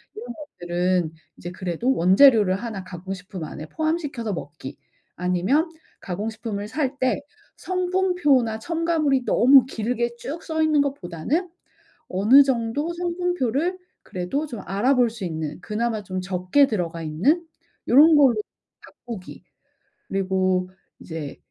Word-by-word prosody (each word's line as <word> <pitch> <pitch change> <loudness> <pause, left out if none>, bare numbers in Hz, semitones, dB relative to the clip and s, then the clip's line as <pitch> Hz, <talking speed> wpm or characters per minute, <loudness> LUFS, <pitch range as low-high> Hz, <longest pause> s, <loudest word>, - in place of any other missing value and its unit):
이런 225 +3 -8
것들은 180 - -2 0.2
이제 175 - -7
그래도 185 +8 -1
원재료를 195 +2 +5
1 205 -2 -5
가공 185 +1 -7
식품 185 -3 -7
안에 155 0 -8
포함시켜서 295 - -2
먹기, 145 -5 -8 0.4
아니면 185 - +1 0.3
가공 200 +4 -3
식품을 210 -2 -5
살 275 +3 -2
때 260 +2 +1 0.3
성분표나 360 -11 +1
첨가물이 320 -3 0
너무 260 0 +6
길게 235 -1 -2
쭉 300 +7 -6
써 315 -1 -2
있는 305 -2 +3
것보다는 280 - -2 0.6
어느 220 +10 +6
정도 270 +5 -1
성분표를 350 -2 -1 0.3
그래도 185 +12 -3
좀 235 -8 -7
알아볼 245 +5 +2
수 225 -3 -7
있는 155 -3 -4
그나마 220 0 -2
좀 185 -1 -4
적게 185 +9 +2
들어가 170 -5 -3
있는 215 - +1 0.4
요런 305 +6 +7
걸로 270 -5 +5 0.5
바꾸기, 225 -7 -10 0.6
그리고 185 -1 0 0.3
이제 160 -4 -7
230 Hz, 275 characters per minute, -23 LUFS, 185-285 Hz, 0.6 s, 요런